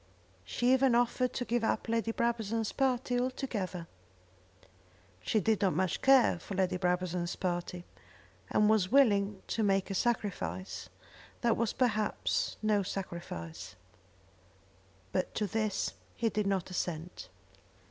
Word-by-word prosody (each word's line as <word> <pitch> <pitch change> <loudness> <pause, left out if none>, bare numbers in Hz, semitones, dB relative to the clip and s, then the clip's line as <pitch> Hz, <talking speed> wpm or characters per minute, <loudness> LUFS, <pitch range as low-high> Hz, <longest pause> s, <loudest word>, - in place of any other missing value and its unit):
She 240 - +2
even 260 -2 +4
offered 245 +1 +2
to 245 - -2
give 240 -1 0
up 220 - 0
Lady 230 0 0
Brabazon's 225 -2 -1
party, 250 -2 +1
altogether. 220 -9 -3 1.4
She 215 - +1
did 215 +2 +1
not 190 -6 +2
much 185 +1 0
care 265 -9 +5
for 195 - -7
Lady 185 -1 +1
Brabazon's 180 -1 -1
party, 175 -1 -3 0.6
and 210 - +3
was 215 -3 +3
willing 205 -7 +3
to 225 - 0
make 195 -1 +1
a - - -1
sacrifice 95 - -2 0.5
that 235 -1 +3
was 230 -2 0
perhaps 245 - 0
no 210 -1 +3
sacrifice. 170 - -6 1.4
But 185 - -1
to 215 - 0
this 215 -1 -1 0.2
he 230 -2 +1
did 210 -2 -1
not 190 -2 -1
assent. 170 - -4
210 Hz, 125 wpm, -31 LUFS, 180-235 Hz, 1.4 s, care